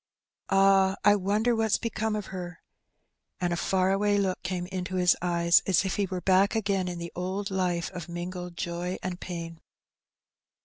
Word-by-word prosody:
Ah! 195 0 +4
I 205 - +7
wonder 210 +5 +1
what's 220 -1 +2
become 220 -1 -2
of 210 -2 -5
her/' 175 -2 -6 0.8
And 175 -2 0
a - - +1
£Eur 190 +2 +1
away 205 +1 +2
look 190 -2 0
came 180 -1 -3
into 185 0 -4
his 180 -1 +4
eyes^ 170 -1 +3
as 190 0 +3
if 190 - -2
he 200 -1 +1
were 185 -1 -4
back 190 +3 +3
again 200 -4 0
in 175 -1 -4
the 170 0 -6
old 190 +3 -3
life 180 -3 -1
of 180 -2 -7
mingled 175 0 -6
joy 175 +2 -3
and 180 -1 -4
pain. 165 -2 -6
185 Hz, 175 wpm, -27 LUFS, 175-195 Hz, 0.8 s, I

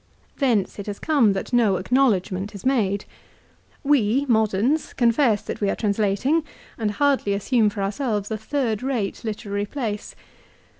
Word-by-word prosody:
Thence 230 -9 +1
it 200 - -6
has 205 -1 -4
come 270 -10 +3
that 195 +6 -5
no 225 -5 +4
acknowledgment 200 -3 +1
is 200 - -10
made. 205 -7 +1 0.8
We, 275 -2 +2
moderns, 220 +5 +1
confess 235 -3 +2
that - - -6
we 200 - +2
are - - 0
translating 215 +9 +1 0.3
and 220 -2 -1
hardly 270 -2 +1
assume 215 +1 +2
for 205 -1 -4
ourselves 210 0 -2
a 220 - -1
third 230 -3 -1
rate 250 -7 -2
literary 205 -2 -3
place. 220 -5 -4
220 Hz, 145 wpm, -23 LUFS, 200-260 Hz, 0.8 s, no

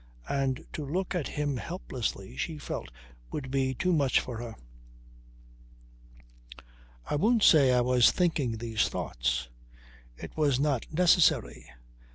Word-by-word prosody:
And 135 -2 -1
to 155 - -4
look 180 +8 -2
at 175 -6 -2
him 145 -2 -2
helplessly 125 - -5
she 160 -2 -3
felt 100 - -6 0.4
would 135 -3 -5
be 130 -1 0
too 180 +7 0
much 140 -5 +3
for 120 -3 -6
her. 115 -2 -7 2.5
I - - -4
won't 220 +8 +2
say 140 -5 +6
I 125 -1 +3
was 125 -1 +5
thinking 145 -10 0
these 110 -2 0
thoughts. 60 +1 -2 0.7
It - - -9
was 145 -4 +2
not 140 -4 -1
necessary. 175 - +3
135 Hz, 130 wpm, -29 LUFS, 120-160 Hz, 2.5 s, say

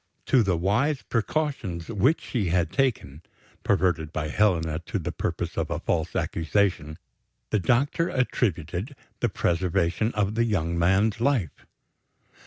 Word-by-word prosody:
To 130 - +4
the 95 -5 +1
wise 120 - +1
precautions 115 - -2
which 115 - +2
she 115 -9 -2
had 85 -1 +1
taken 115 - -1 0.4
perverted 80 -4 +1
by 75 -1 -3
Helena 80 -4 +1
to - - -2
the - - -3
purpose - - -3
of - - -2
a - - -2
false 80 -1 -1
accusation 80 -3 0 0.5
the 110 - +2
doctor 135 - +1
attributed 105 - -1 0.2
the - - +1
preservation 90 +4 0
of 105 -1 0
the 115 +1 +2
young 85 -7 0
man's 95 +6 +2
life. 120 - 0
95 Hz, 135 wpm, -26 LUFS, 85-120 Hz, 0.5 s, To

